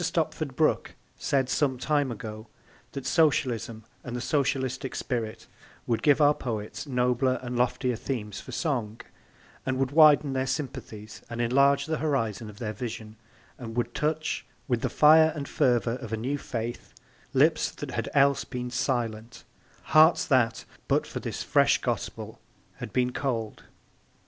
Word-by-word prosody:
Stopford - - -2
Brooke - - +1 0.2
said 135 -2 +1
some 130 0 +1
time 145 0 0
ago 110 0 -7 0.5
that 140 - -6
Socialism 120 -8 +1 0.2
and 120 -1 -6
the - - -2
socialistic 130 -1 -1
spirit 115 -3 -3 0.4
would 115 -2 0
give 145 -1 +4
our 145 -1 +6
poets 110 -4 -5
nobler 125 0 +1
and 125 0 -4
loftier 125 0 0
themes 105 -5 -4
for - - -10
song, 120 -9 -2 0.7
would 130 0 0
widen 150 -2 +6
their 130 0 -1
sympathies 130 -6 -5
and 115 - -6
enlarge 140 +4 +3
the 160 -1 -2
horizon 115 -8 -1
of 105 - -12
their 110 -2 -4
vision 110 -1 -6 0.4
and 115 -3 -7
would 120 0 -1
touch, 155 +1 -1 0.2
with 120 -4 0
the - - 0
fire 160 +1 +6
and 140 -2 -5
fervour 120 -4 +1
of 120 -4 -9
a 110 - -1
new 135 +6 -2
faith, 120 -1 -5 0.4
lips - - +3
that - - -7
had - - -3
else 140 0 +4
been 125 -1 -5
silent, 115 -3 -2 0.4
hearts 155 +2 +5
that 120 -5 +2 0.2
but - - +2
for - - -6
this - - -4
fresh - - +4
gospel - - -4 0.4
had - - -7
been 125 +1 +1
cold. 115 -6 -3
125 Hz, 150 wpm, -27 LUFS, 115-140 Hz, 0.7 s, our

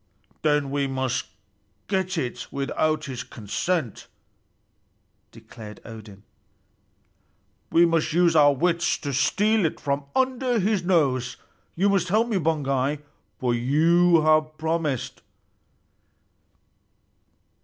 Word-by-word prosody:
"Then 150 -2 +1
we 140 -1 0
must 130 -2 -2 0.6
get 190 -2 -1
it 125 -6 -4
without 150 +2 -1
his 130 -3 -5
consent," 125 - -3 1.2
declared 105 -2 -12
Odin. 105 -3 -11 1.5
"We 170 +1 +5
must 165 -1 +1
use 170 +1 +3
our 145 -2 +6
wits 170 +4 +1
to 140 -2 -5
steal 210 - +2
it 160 - -1
from 140 0 -2
under 255 -1 +1
his 205 -2 +1
nose. 135 -9 +1 0.4
You 195 +4 +2
must 195 -3 +2
help 215 +5 +2
me, 215 - +1
Baugi, 145 -3 -1 0.4
for 125 -2 0
you 165 +7 +3
have 155 0 +2
promised." 160 -5 -2
155 Hz, 105 wpm, -24 LUFS, 135-175 Hz, 1.5 s, our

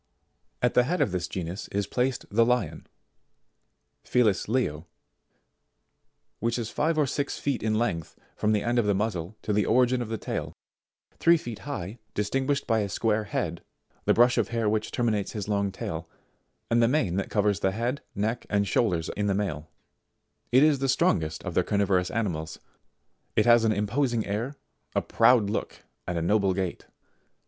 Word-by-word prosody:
72. - - +6
At 125 - +2
the 125 - +5
head 180 +6 -1
of - - +2
this 90 -1 -2
genus 90 +2 -5
is 100 0 -1
placed 125 +4 -1
the 115 +3 +4
Lion, 115 -10 0 1.2
Felis 110 -6 +2
Leo, 90 - -1 1.5
which 115 +2 0
is 115 -2 -4
five 160 +1 0
or 150 - +4
six 140 +1 -2
feet 140 -3 -1
in 110 -1 0
length 95 -9 -2 0.2
from 105 - +1
the 105 -1 +1
end 120 0 +1
of 110 - +1
the 100 - +3
muzzle 105 -2 -2
to 105 - -1
the 105 0 +2
origin 125 +1 +3
of 115 - -4
the 115 - -2
tail, - - -4 0.7
three 170 0 +5
feet 120 -8 -7
high, 110 -4 -5 0.2
distinguished 135 +7 0
by 115 -1 +2
a 100 -1 -1
square 110 +1 0
head, 85 -4 -3 0.4
the - - +4
brush 120 +1 +5
of 110 - +1
hair 115 -2 -1
which 105 0 0
terminates 110 -5 0
his 105 -3 -4
long 100 -1 0
tail, 80 -3 -5 0.6
and 120 0 +4
the 115 - +5
mane 120 - +1
that 100 - -2
covers 105 -3 +1
the 95 - +2
head, 120 +8 -2
neck 110 +4 -2
and 100 -1 +1
shoulders 90 -6 +1
in 105 0 -1
the 100 - +1
male. 80 -7 -3 0.8
It 130 +3 +6
is 150 -3 +4
the 135 0 0
strongest 80 - +1
of - - -4
the - - +3
carnivorous 95 -3 +1
animals. 85 -8 -2 0.8
It 105 - +3
has 120 -1 +6
an 110 - +3
imposing 115 +3 0
air, 115 +8 -3 0.4
a - - +2
proud 115 -3 +4
look, - - -4 0.2
and 85 -2 -1
noble 100 -1 +2
gait. 95 -2 -3
110 Hz, 180 wpm, -27 LUFS, 95-120 Hz, 1.5 s, 72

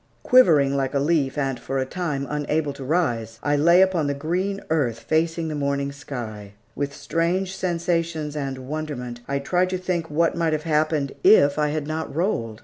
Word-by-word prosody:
Quivering 155 - +5
like 135 0 -1
a - - +3
leaf 145 -2 +1
and 135 -3 -1
for 135 +3 -4
a 130 - 0
time 150 -3 -3
unable 150 0 -1
to 140 - -9
rise, 120 -8 -1
I 145 0 +2
lay 170 +5 +6
upon 180 -6 +1
the 140 - -1
green 180 +7 -2
earth 130 -8 +1
facing 160 +5 0
the 155 - -3
morning 140 -1 -1
sky. 120 -8 -7 0.2
With 140 0 -3
strange 170 +6 -1
sensations 170 -4 -1
and 135 -3 -4
wonderment, 140 -5 -5
I 140 - -1
tried 180 +6 +1
to 185 - -1
think 175 -3 -2
what 165 +3 +1
might 165 -2 +1
have 155 -1 -1
happened, 155 -3 +1
if 150 -8 +6
I 150 - +2
had 150 0 -2
not 155 -1 -4
rolled. 115 - -1
150 Hz, 185 wpm, -23 LUFS, 140-170 Hz, 0.2 s, lay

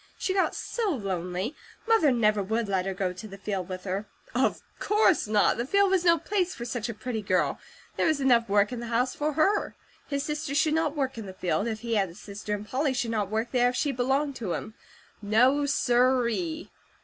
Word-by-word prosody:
She 375 - -1
got 380 -1 +1
so 460 -4 -2
lonely; 190 - -3 0.3
Mother 445 -11 +4
never 215 -4 +2
would 220 +3 -1
let 190 -1 0
her 195 - -1
go 185 -1 -1
to 185 +4 -9
the 195 -1 -10
field 195 -2 -4
with 185 0 -6
her. 195 +2 -3 0.3
Of - - +1 0.2
course 415 - +3
not! 210 0 +3
The 235 - -1
field 400 +3 +3
was 375 -2 +2
no 340 -1 +5
place 375 0 -1
for 235 - -6
such 240 -1 -3
a - - -3
pretty 235 -1 -4
girl; 185 -2 0 0.4
there - - +2
was 315 -2 +2
enough 240 -5 +3
work 205 +2 +3
in 245 - -4
the 235 - -6
house 240 +2 +1
for 300 +1 -1
her. 385 +8 +1 0.3
His 280 -2 -2
sister 300 -1 -3
should 305 +1 +3
not 320 -2 0
work 265 -4 -2
in 210 - -7
the 190 - -9
field, 185 +4 -1
if 220 -2 -3
he 235 -1 -3
had 195 -2 +1
a 170 - -13
sister, 210 +1 -5
and 205 +1 -8
Polly 265 +2 0
should 235 -2 -1
not 210 -3 -1
work 220 +3 -2
there, 245 -1 +3
if 250 - -4
she 290 +3 +1
belonged 270 +3 0
to 195 -7 -3
him; 215 - -5 0.5
No 250 +8 +3
sir 250 -2 +3
ee! 320 +6 -4
240 Hz, 225 wpm, -27 LUFS, 205-290 Hz, 0.5 s, no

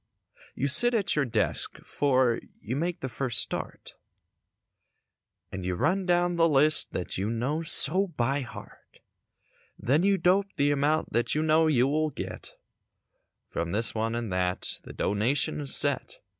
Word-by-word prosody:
You 140 - -1
sit 240 - +4
at 205 -4 0
your 150 -2 +1
desk 120 - -2
'fore 130 -4 +1 0.2
you 120 +4 -5
make 170 +4 -3
the 130 - -3
first 125 -1 -1
start - - -4 1.6
And 95 - -6
you 90 0 -2
run 185 - 0
down 175 0 +1
the 165 0 +3
list 150 +1 +4
that 90 - -4
you 100 +3 -2
know 125 +8 -2
so 165 +4 +2
by 140 -4 -1
heart; 125 - -13 0.8
Then 140 +7 +1
you 195 +1 +2
dope 195 +2 +1
the 145 0 +1
amount 145 +2 0
that 120 +4 0
you 155 - 0
know 160 +1 +3
you 130 -4 +2
will 155 +2 0
get - - -8 0.9
From 85 +1 -4
this 115 +3 +1
one 115 +1 -2
and 115 -5 -4
that. 90 0 -1
The - - -12
donation 125 +9 0
is 140 - +4
set. 145 -1 +1
140 Hz, 155 wpm, -27 LUFS, 120-160 Hz, 1.6 s, sit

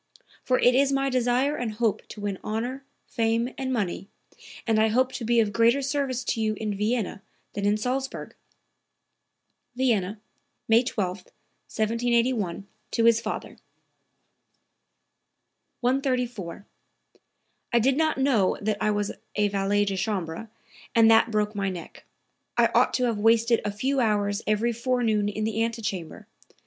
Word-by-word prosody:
For 255 - +1
it 245 - +4
is 275 +2 +3
my 275 0 +1
desire 255 +3 +1
and 235 -5 -3
hope 220 -1 -1
to 210 - -10
win 200 -2 -3
honor, 245 +5 -3 0.2
fame 230 +2 0
and 265 -1 -3
money, 200 -4 -2 0.6
and 225 -2 +2
I 220 - +4
hope 255 +4 +2
to 245 - -6
be 235 +1 +3
of 210 -2 +1
greater 235 +5 +3
service 270 -2 -1
to 230 - -1
you 215 -1 0
in 210 -1 -3
Vienna 210 -1 -1 0.3
than 200 0 -1
in 205 +1 +3
Salzburg." 260 +4 -3 1.4
(Vienna, 220 -6 0 0.5
May 225 +1 +5
12, 200 -7 -2
1781, 230 0 -2 0.2
to 230 - +1
his 230 0 +5
father.) 215 - -5 2.2
134. 250 - -1 1.1
"I 235 - +3
did 260 +3 +3
not 315 +1 +1
know 260 -8 +2
that 210 0 -2
I - - +2
was 205 -1 0 0.2
a 210 0 +2
valet 200 +1 +1
de 195 -1 -2
chambre, 190 0 -3 0.5
and 225 -1 +6
that 225 +1 +5
broke 210 -1 0
my 200 -2 -1
neck. 180 -3 -9 0.5
I - - +4
ought - - +3
to 255 - 0
have 230 -4 0
wasted 230 +2 +3
a 205 - -1
few 265 +7 -1
hours 205 -3 +1
every 215 +3 +1
forenoon 230 -4 0
in 215 +1 -3
the 220 +1 0
antechamber. 215 -7 -4
225 Hz, 145 wpm, -26 LUFS, 205-250 Hz, 2.2 s, and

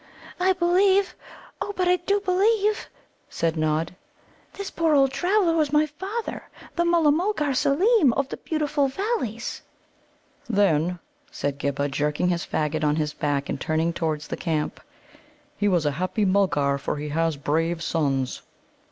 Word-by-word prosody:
"I 375 +1 +3
believe 375 +2 +3 0.5
oh, 410 - -3
but 365 -1 +1
I 360 0 +4
do 395 +3 0
believe," 415 +3 +1 0.4
said 165 -1 -1
Nod, 155 +2 -1 0.6
"this 400 -1 -6
poor 325 -2 +2
old 270 -1 +4
traveller 360 +2 +2
was 305 -3 +1
my 300 +1 +4
father, 385 +10 -6 0.3
the 345 - +2
Mulla 340 -3 +4
mulgar 310 -3 0
Seelem, 315 - +3
of 275 +2 0
the - - -5
beautiful 300 -3 0
Valleys." 270 - -3 0.9
"Then," 180 -5 +2 0.3
said 140 - -3
Ghibba, 140 0 -1
jerking 150 +5 0
his 170 -1 0
faggot 155 0 -2
on 150 0 +2
to - - -1
his 150 -1 -2
back, 140 -1 -1
and - - -4
turning 160 +2 0
towards 155 -3 -2
the - - -4
camp, 155 -3 -2 0.8
"he 205 - 0
was 175 -5 +2
a 145 - +2
happy 185 +7 -1
Mulgar, 165 -8 +2
for - - -2
he 150 +1 -5
has 165 0 0
brave 165 +4 -1
sons." 135 -5 -1
205 Hz, 155 wpm, -24 LUFS, -, 0.9 s, I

